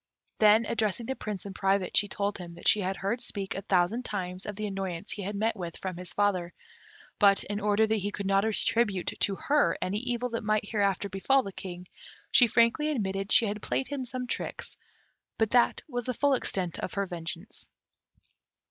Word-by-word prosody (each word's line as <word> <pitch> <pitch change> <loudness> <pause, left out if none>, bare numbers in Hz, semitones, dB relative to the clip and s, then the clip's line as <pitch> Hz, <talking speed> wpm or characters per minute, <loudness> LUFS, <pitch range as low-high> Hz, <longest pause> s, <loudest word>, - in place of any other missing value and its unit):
Then, 215 +1 +6
addressing 220 +1 -1
the 265 - -2
Prince 210 -6 -5
in 200 - -6
private, 195 -1 0
she 205 - +4
told 200 +1 -2
him 170 -1 -8
that 170 - -4
she 210 - +6
had 190 0 -2
heard 205 +6 -2
speak 200 -5 -3
a 195 - -4
thousand 195 +5 +1
times 185 -4 -4
of 210 - -4
the 215 +1 -3
annoyance 195 -2 -4
he 205 - -4
had 200 +2 -4
met 220 +3 0
with 175 -4 -6
from 185 -2 -4
his 180 -1 -6
father; 185 -4 0 0.6
but, 200 -2 +5
in 205 0 -3
order 210 +1 +3
that 220 0 +1
he 205 0 -2
should 200 - -3
not 195 0 +3
attribute 215 -3 0
to 200 - +2
her 290 +8 +2
any 200 +3 -1
evil 245 0 -2
that 230 -1 -3
might 215 -1 +1
hereafter 200 -2 0
befal 230 +8 +2
the 195 - -7
King, 180 -1 -8 0.4
she 245 - +7
frankly 235 +7 +3
admitted 195 -7 -2
she 230 - +6
had 210 0 -3
played 265 - -1
him 280 -2 -3
some 250 0 -4
tricks, - - -4 0.6
but 220 -1 +1
that 245 -1 +3
was 245 -5 -3
the 255 - -1
full 285 +2 +3
extent 185 -8 -1
of - - -4
her 200 0 0
vengeance. 170 +2 -5
205 Hz, 200 wpm, -29 LUFS, 190-230 Hz, 0.6 s, she